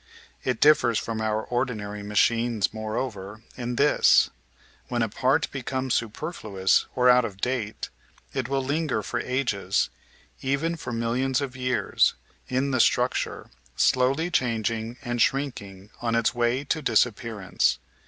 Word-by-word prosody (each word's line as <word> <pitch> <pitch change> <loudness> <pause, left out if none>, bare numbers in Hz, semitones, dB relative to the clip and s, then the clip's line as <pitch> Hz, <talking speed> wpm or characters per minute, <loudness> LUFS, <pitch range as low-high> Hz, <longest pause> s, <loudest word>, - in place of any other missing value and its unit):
It 125 -3 -1
diflfers 145 -7 +5
from 110 -1 -4
our 110 0 0
ordinary 110 -5 -3
machines, 110 0 +1
moreover, 110 -1 -5
in 120 -1 -4
this: 145 +4 +4 0.6
when 120 -2 0
a 115 - -1
part 130 +5 +1
becomes 130 -1 -2
superfluous 110 - 0
or 125 -1 +3
out 125 0 +6
of 100 -4 -6
date, 120 -3 -2 0.4
it 130 -2 -2
will 135 -1 0
linger 140 -5 -1
for - - -3
ages, 110 -7 0 0.5
even 140 +5 0
for 155 - -6
millions 120 +3 0
of 135 -3 -4
years, 125 -1 +1 0.3
in 130 +2 0
the 130 - +1
structure, - - +1 0.2
slowly 135 +7 +2
changing 115 - -1
and 120 -2 -2
shrinking 105 -9 -1
on 115 -1 0
its 115 -1 +2
way 120 +2 +1
to 155 +2 -1
disappearance. 110 -5 +1
120 Hz, 135 wpm, -26 LUFS, 110-130 Hz, 0.6 s, out